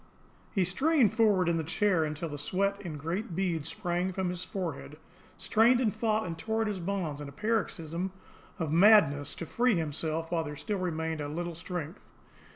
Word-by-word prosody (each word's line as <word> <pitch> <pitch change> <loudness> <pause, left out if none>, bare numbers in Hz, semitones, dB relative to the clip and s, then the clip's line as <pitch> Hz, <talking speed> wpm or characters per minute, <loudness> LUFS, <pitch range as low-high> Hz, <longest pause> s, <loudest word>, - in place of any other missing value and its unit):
He 195 - +2
strained 265 - +3
forward 205 -6 +3
in 170 -1 +2
the 160 - -1
chair 180 +1 +2
until 155 +2 -4
the 145 -1 -6
sweat 200 +6 0
in 170 -6 -6
great 170 +5 -3
beads 165 -5 -1
sprang 180 0 -1
from 185 -1 -1
his 180 0 -3
forehead, 160 -5 -5 0.4
strained 235 +3 +4
and 225 -5 +1
fought 220 -1 +1
and 170 -2 -4
tore 220 +7 -2
at - - -2
his 205 -3 -2
bonds 170 -5 -3
in 145 - -6
a - - -11
paroxysm 185 -4 -2 0.5
of 160 -3 -2
madness 160 -6 +5
to 170 - -5
free 240 +5 +2
himself 160 0 -2
while 165 -2 +1
there 150 -1 -6
still 205 +6 -3
remained 160 -3 -2
a 145 - -3
little 170 +3 -4
strength. 170 0 -6
175 Hz, 185 wpm, -30 LUFS, 160-205 Hz, 0.5 s, madness